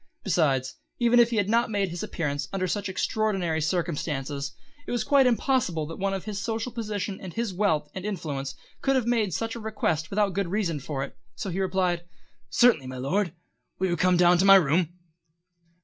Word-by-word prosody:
Besides, 140 -8 +1 0.2
even 240 0 +4
if 235 -1 +6
he 235 - -2
had 200 -2 +2
not 230 +2 +2
made 200 -3 0
his 170 0 -5
appearance 145 -3 -2
under 185 -1 -1
such 200 +1 -2
extraordinary 190 -5 0
circumstances, 145 -4 -2 0.4
it - - -4
was 240 -1 0
quite 275 -2 +5
impossible 235 - +1
that 165 +2 -8
one 195 0 0
of 190 - -6
his 205 -2 -4
social 225 +2 -2
position 210 -4 -4
and 185 - -7
his 230 -4 -2
wealth 175 -6 +1
and 190 - -6
influence 145 -10 -4 0.3
could 270 0 +2
have 255 -3 +1
made 230 -5 +1
such 225 +7 -2
a 235 - -6
request 210 -8 -1
without 200 -1 +1
good 200 0 -1
reason 175 -5 -1
for 135 0 -3
it, 140 - -8 0.2
so 195 - -4
he 180 - -3
replied: 180 -2 0 0.5
"Certainly, 235 - +4
my 130 0 -6
Lord. 175 +8 0 0.5
Will 190 0 0
you 175 - +1
come 180 +1 +3
down 175 0 +5
to - - +4
my 195 0 +9
room?" 165 -1 +3
190 Hz, 195 wpm, -26 LUFS, 160-215 Hz, 0.5 s, my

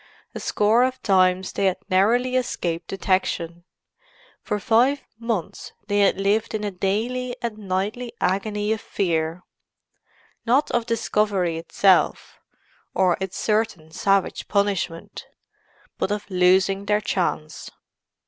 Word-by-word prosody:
A - - -6
score 215 +4 +2
of 260 0 -1
times 185 -2 +3
they 195 - +1
had 185 -1 +1
narrowly 235 +7 +2
escaped 175 -9 -2
detection. 175 -3 -1 0.8
For 210 - -2
five 250 +7 +2 0.2
months 230 -7 -4
they 205 -1 0
had 200 -1 +3
lived 215 +3 +1
in 210 - -3
a 205 - -2
daily 230 +7 -2
and 230 -2 -4
nightly 205 +5 -3
agony 205 +3 0
of 220 - -5
fear—not 180 - -3
of 240 -1 0
discovery 205 -6 0
itself, 190 +3 +2 0.6
or 185 -2 +3
its 190 0 -4
certain 210 -7 -1
savage 195 +3 0
punishment, 200 -5 -2 0.7
but - - 0
of 210 0 -3
losing 190 +2 +3
their 210 +1 +2
chance. 165 -6 -2
200 Hz, 120 wpm, -23 LUFS, 185-220 Hz, 0.8 s, times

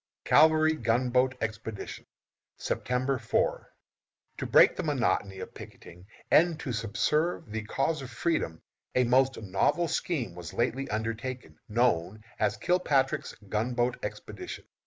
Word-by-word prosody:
CAVALRY 155 +1 +5
GUNBOAT 125 +2 +2
EXPEDITION. 110 -1 -5 0.5
September 130 +1 -1
4. - - 0 0.7
To - - -3
break - - +6
the - - -2
monotony 95 -1 0
of - - -8
picketing 90 +3 -12 0.2
and 165 0 +5
to 130 -6 -4
subserve 115 +6 0
the 110 +1 -2
cause 140 +7 -1
of 130 - -7
freedom, 115 - -2 0.3
a 125 - +4
most 130 +2 +3
novel 105 - +1
scheme 135 - -2
was 85 -1 -9
lately 130 +3 -1
undertaken, 115 -4 -4
known 105 -3 +1 0.2
as 105 +1 +1
Kilpatrick's 145 -7 +1
Gunboat 120 +4 -1
Expedition. - - -7
125 Hz, 120 wpm, -29 LUFS, 110-135 Hz, 0.7 s, break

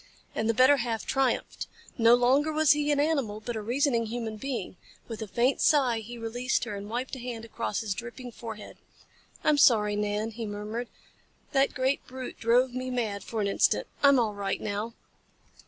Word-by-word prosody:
And 220 +1 -1
the 230 - +2
better 260 +4 +6
half 235 -3 -2
triumphed. 270 -2 -1 0.3
No 230 0 +6
longer 265 +5 +3
was 310 -2 +4
he 295 0 +2
an 290 - +2
animal, 280 -9 0
but 235 +2 -5
a 220 - -3
reasoning 235 0 +1
human 225 -1 -4
being. 235 -4 -4 0.3
With 225 -1 -7
a 220 - -4
faint 240 +7 +1
sigh 260 -6 +3
he 235 +2 -8
released 240 +3 -1
her - - -4
and 200 +1 -7
wiped 250 +4 -3
a - - -8
hand 235 -2 -6
across 230 -2 -3
his 215 -3 -2
dripping 240 +4 -8
forehead. 220 -2 -9 0.7
"I'm 300 -1 +3
sorry, 210 -6 +5
Nan," 210 +2 -1
he 225 0 -5
murmured. 210 +4 -4 0.6
"That 275 -1 +2
great 260 +2 0
brute 255 0 -7
drove 245 +2 +3
me 255 0 -3
mad 220 -5 -2
for 225 -2 -3
an 200 - +1
instant. 200 - +2 0.2
I'm 280 -1 +6
all 220 -3 +1
right 200 -1 -2
now." 210 +3 -4
235 Hz, 190 wpm, -28 LUFS, 220-260 Hz, 0.7 s, better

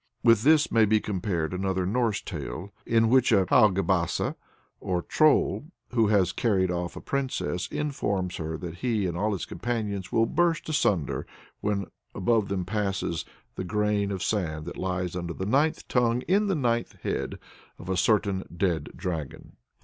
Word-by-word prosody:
With 115 -3 +6
this 155 +5 +4
may 115 -1 +5
be 110 +1 +3
compared 90 -5 -2
another 95 0 -1
Norse 115 +1 0
tale, 95 +5 -6
in 115 -1 +4
which 130 +1 +4
a 100 -4 +4
Haugebasse, 95 -5 +3 0.5
or 90 -1 -1
Troll, 155 -1 +3 0.3
who 115 -3 +3
has 100 -4 +3
carried 95 -4 +1
off 85 0 -3
a - - -7
princess, 130 -9 -2
informs 100 -11 -2
her 80 0 -4
that 85 -1 -7
he 110 -4 0
and 85 -2 -2
all 105 +5 0
his 95 - -3
companions 105 -6 -3
will 115 0 +3
burst 170 +5 +1
asunder 105 - 0 0.3
when 100 -1 -1 0.3
above 110 0 +2
them 95 -2 -2
passes 95 -4 -2 0.3
"the - - -4
grain 105 +1 0
of 95 -2 -3
sand 80 -8 -1
that 85 - -6
lies 90 -1 -2
under 85 -1 -4
the 95 - -3
ninth 140 +9 +1
tongue 120 -1 +2
in 205 +3 +2
the 195 - +1
ninth 120 -5 0
head" - - -2 0.4
of 90 - -11
a 95 - 0
certain 100 0 +2
dead 90 -3 0
dragon. 80 -6 -5
100 Hz, 165 wpm, -27 LUFS, 90-115 Hz, 0.5 s, With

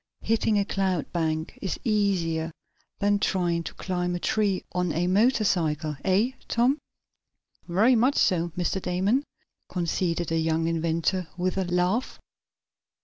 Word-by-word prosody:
Hitting 220 -1 +1
a 200 - +2
cloud 190 -5 -1
bank 160 -2 -2
is 190 - -3
easier 185 - +1 0.5
than 205 0 +2
trying 175 -4 +1
to - - -6
climb 180 -1 -2
a - - -2
tree 200 0 0
on 180 -1 0
a 170 +3 0
motorcycle, 180 - +2
eh, 200 +6 +2 0.2
Tom?" 250 +5 +2 0.9
"Very 210 +9 +4
much 250 +5 +3
so, 175 -2 +2
Mr. 180 +2 -1
Damon," 190 +10 +1 0.5
conceded 175 -1 -1
the 165 0 +1
young 160 0 +1
inventor, 165 +2 0
with 185 +1 0
a 190 -1 0
laugh. 180 +7 0
180 Hz, 135 wpm, -26 LUFS, 170-205 Hz, 0.9 s, Very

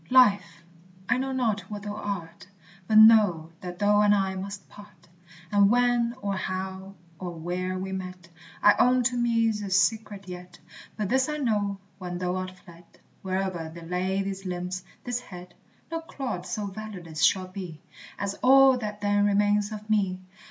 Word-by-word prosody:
Life! 200 -10 +4 0.4
I 250 +1 +2
know 265 +1 -2
not 220 -7 -1
what 205 -1 -6
thou 205 -1 -4
art, 200 -6 -6 0.4
But 215 - +3
know 210 -8 +6
that 180 -1 -7
thou 205 +1 +3
and 205 0 +5
I 195 -1 0
must 195 +1 -7
part; 195 -5 -16 0.4
And 200 -1 +5
when, 240 0 +2
or 200 -1 -1
how, 190 +1 -5 0.2
or 180 -2 -5
where 180 +3 -3
we 190 +1 -4
met 185 -2 -6 0.4
I 205 - +8
own 250 0 +4
to 245 +1 +1
me's 230 -3 +1
a 200 - -5
secret 200 0 +1
yet. 180 0 -9 0.4
But 210 -3 -2
this 265 +3 +2
I 300 - -2
know, 210 -7 0 0.2
when 180 -1 -5
thou 180 0 -2
art 185 0 -3
fled, 175 -2 -16 0.4
Where'er 185 -3 -2
they 170 +1 -11
lay 185 +3 -1
these 195 0 -5
limbs, 180 0 -4 0.2
this 245 -1 -2
head, 180 -6 -11 0.4
No 330 0 -2
clod 260 - -5
so 210 - -3
valueless 190 -6 -7
shall 185 -1 +3
be, 180 -5 -8 0.4
As 200 0 -2
all 265 0 +6
that 210 -2 -5
then 205 0 +2
remains 205 +1 +2
of 210 0 -7
me. 195 -4 +1
200 Hz, 170 wpm, -26 LUFS, 185-215 Hz, 0.4 s, I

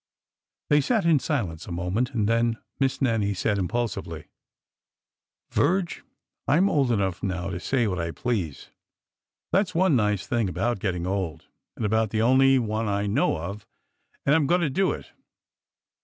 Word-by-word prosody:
They 145 0 +6
sat 215 - +1
in 165 -4 +5
silence 100 - -3
a - - -7
moment, 90 +8 -1
and 105 -3 +1
then 115 0 +2 0.2
Miss 135 0 0
Nannie 110 -5 +1
said 100 +2 0
impulsively: 95 -6 -3 1.2
Virge, 185 -1 +1 0.4
I 145 - +4
'm 195 +3 +3
old 135 -5 +2
enough 95 -5 0
now 95 0 -2
to 85 - -4
say 125 +5 0
what 95 -4 -1
I 85 0 -2
please. 90 - -3 0.8
That 195 +1 +3
's 180 - -11
one 180 -3 +4
nice 105 -5 +1
thing 115 -5 0
about 100 +6 -1
getting 90 -3 -2
old— 95 -4 -3 0.3
and 110 - -3
about 110 +1 +1
the 110 +1 0
only 135 +2 +5
one 110 -2 -1
I 100 0 0
know 100 -4 +1
of— 100 +6 -7 0.6
and 140 - +4
I - - +6
'm 150 -4 +1
going 175 +4 +3
to 155 -5 0
do 190 +7 +2
it. - - -7
110 Hz, 170 wpm, -25 LUFS, 95-135 Hz, 1.2 s, They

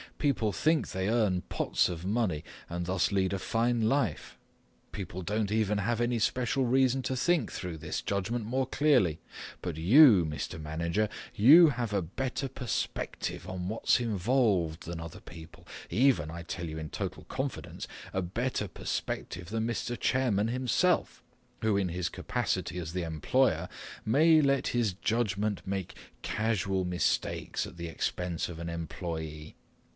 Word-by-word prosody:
People 120 -7 +1
think 155 +7 +1
they 95 +1 -1
earn 105 -6 +2
pots - - 0
of 85 -1 -5
money 100 -7 0 0.3
and 85 +1 -3
thus 95 +2 +1
lead 95 -1 +1
a 100 - -1
fine 115 +3 +1
life. 110 - 0 0.5
People 95 -2 -5
don't 105 +2 -1
even 105 -1 +1
have 115 +3 0
any 120 0 +1
special 125 +3 +1
reason 130 +1 +3
to 130 - -1
think 170 +6 +1
through 90 -3 -5
this 80 0 -4
judgment 105 +4 -2
more 130 +4 0
clearly. 125 - +3 0.4
But 85 -4 -4
you, 105 - +7
Mr. 75 +1 -4
Manager, 85 +7 -1 0.3
you 150 +10 +8
have 120 -5 -2
a 100 -3 +1
better 130 - -3
perspective 120 -7 -3
on 90 -1 -4
what's 110 +3 +2
involved 105 -7 +1
than 85 0 -5
other 85 -1 -8
people, 80 -2 -13 0.2
even, 115 - +3
I 85 +1 -7
tell 85 0 -5
you 80 0 -6
in 80 -1 -6
total - - -5
confidence, - - -5 0.3
a 95 - 0
better 105 +4 -2
perspective 85 0 -4
than 115 +1 -1
Mr. 120 +1 -3
Chairman 115 -5 +2
himself, 130 +9 +1 0.4
who 110 -2 +2
in 95 -2 +1
his 85 -1 -2
capacity - - -2
as 85 -2 -5
the 90 -1 -1
employer 85 +3 +1 0.4
may 155 +7 +5
let 140 -1 +2
his 115 -5 +1
judgment 105 0 -1
make 95 -2 -3 0.3
casual 100 -4 0
mistakes 90 0 -1
at - - -12
the 85 0 -5
expense 85 +2 -2
of 85 - -7
an 85 0 -4
employee. 80 -2 -5
100 Hz, 150 wpm, -30 LUFS, 85-120 Hz, 0.5 s, you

